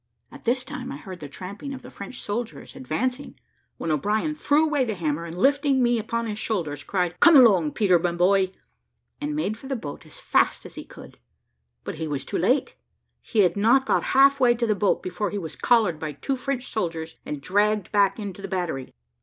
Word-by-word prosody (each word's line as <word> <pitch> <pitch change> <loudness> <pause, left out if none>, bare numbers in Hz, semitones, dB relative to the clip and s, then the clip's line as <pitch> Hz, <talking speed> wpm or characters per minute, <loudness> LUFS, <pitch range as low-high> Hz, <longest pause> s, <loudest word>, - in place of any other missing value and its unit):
At - - -13
this 250 +2 +1
time - - -7
I - - -6
heard 185 +3 -9
the 145 -3 -8
tramping 200 - -7
of 260 - -11
the - - -11
French 200 +5 -8
soldiers 225 +2 -5
advancing, 260 +1 -3 0.4
when 165 - -2
O'Brien 210 - 0
threw 300 +1 +2
away 295 -4 +1
the 225 -4 -2
hammer, 165 -2 -2
and 170 +1 -8
lifting 275 - +3
me 240 -1 +2
upon 230 +2 -2
his 215 -1 -4
shoulders, 160 -12 -2
cried, 180 -3 -2
"Come 335 -2 +7
along, 195 - +6
Peter, 185 -5 +3
my 175 +1 0
boy," 185 +2 +3 0.7
and 295 0 -2
made 220 -8 -1
for 265 - -11
the 270 - -2
boat 150 - -7
as - - -11
fast - - +1
as - - -10
he - - -8
could; - - -14 0.6
but 155 - -6
he 160 - -2
was 145 -2 -3
too - - -2
late; 250 +10 +1 0.5
he 220 - +1
had 180 -3 +3
not 230 +6 +4
got - - +1
half 275 +1 +6
way 245 -2 +4
to 235 0 -1
the 215 - +2
boat, 205 -1 +1
before 185 +3 -2
he 205 - -4
was 165 -6 -6
collared 215 -10 +2
by 155 -1 -4
two 270 - -2
French 260 0 -3
soldiers, 165 -6 -4
and 150 - -5
dragged 205 +5 +1
back 200 -2 +3
into 200 -3 -6
the 195 - -5
battery. 175 -9 -3
205 Hz, 210 wpm, -25 LUFS, 175-250 Hz, 0.7 s, Come